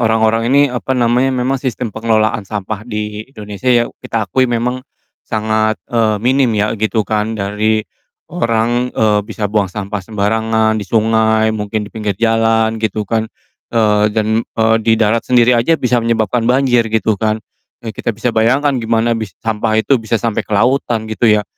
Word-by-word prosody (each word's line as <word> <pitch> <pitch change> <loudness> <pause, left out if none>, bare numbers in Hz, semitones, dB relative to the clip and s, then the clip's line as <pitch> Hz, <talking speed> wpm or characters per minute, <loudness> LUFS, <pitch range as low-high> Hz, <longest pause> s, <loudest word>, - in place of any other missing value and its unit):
orang-orang 110 0 +2
ini, 140 +2 +5
apa 130 +1 -2
namanya, 120 +2 +2
memang 130 +1 -1
sistem 125 -4 -3
pengelolaan 110 -1 +1
sampah 105 0 -4
di 105 -1 -4
Indonesia 105 -1 -6
ya 120 -1 +4 0.2
kita 110 -2 -2
akui 130 -1 +2
memang 125 +2 -1 0.5
sangat, 110 0 0
eee, 110 -3 +2
minim 130 +1 +3
ya 105 +1 +1
gitu 110 0 0
kan 110 +1 -1
dari 105 +2 0 0.5
orang, 115 +2 0
eee, 105 -1 +2
bisa 110 -1 -4
buang 105 -2 +1
sampah 100 +2 -5
sembarangan 110 +2 0
di - - -5
sungai 110 0 +2
mungkin 105 0 -3
di 105 - -11
pinggir 105 -3 -3
jalan 115 0 +1
gitu 110 -1 -1
kan, 110 +1 -1 0.4
eee, 105 -2 +2
dan, 110 +1 0
eee, 110 -1 +1
di 110 0 +2
darat 110 +1 +1
sendiri 125 0 +4
aja 120 +8 +2
bisa 125 -3 +1
menyebabkan 115 +1 0
banjir 125 -3 +2
gitu 110 -1 0
kan. 110 -1 +1 0.5
Eee, 110 - -4
kita 110 - -5
bisa 120 +1 -1
bayangkan 130 +6 +2
gimana 115 +1 +1
bis 110 -6 -5
sampah 110 0 0
itu 125 +3 +2
bisa 115 +1 -1
sampai 115 -1 -1
ke - - -10
lautan 120 -1 +1
gitu 115 +1 +2
ya, 105 -1 +3
110 Hz, 170 wpm, -16 LUFS, 110-120 Hz, 0.5 s, ini